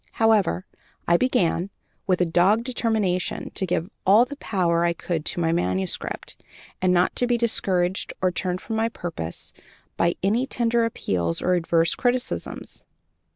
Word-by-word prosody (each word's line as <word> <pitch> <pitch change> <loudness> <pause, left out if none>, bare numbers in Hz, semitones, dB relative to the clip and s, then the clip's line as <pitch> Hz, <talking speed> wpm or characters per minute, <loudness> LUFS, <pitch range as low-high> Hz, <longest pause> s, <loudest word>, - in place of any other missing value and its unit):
However, 210 -5 +2 0.4
I 170 - +5
began, 185 -5 +1 0.4
with 185 -2 +2
a - - +4
dogged 185 +7 +3
determination 220 -7 -1
to 190 - -3
give 175 +2 -1
all 210 +5 +6
the 285 - -8
power 170 -8 +1
I 170 0 +2
could 165 -2 -3
to - - -2
my 165 -1 +1
manuscript, 95 - -2 0.4
and 185 0 +3
not 180 0 +2
to 245 - +1
be 240 -1 +2
discouraged 190 -5 +1
or 185 -1 +2
turned 180 0 -2
from 225 - -4
my 225 +1 +1
purpose 165 - -6 0.4
by 170 0 +2
any 225 +7 +1
tender 235 -2 +2
appeals 85 - -1
or 180 - +1
adverse 165 -1 +2
criticisms. 245 0 -3
185 Hz, 155 wpm, -24 LUFS, 170-225 Hz, 0.4 s, all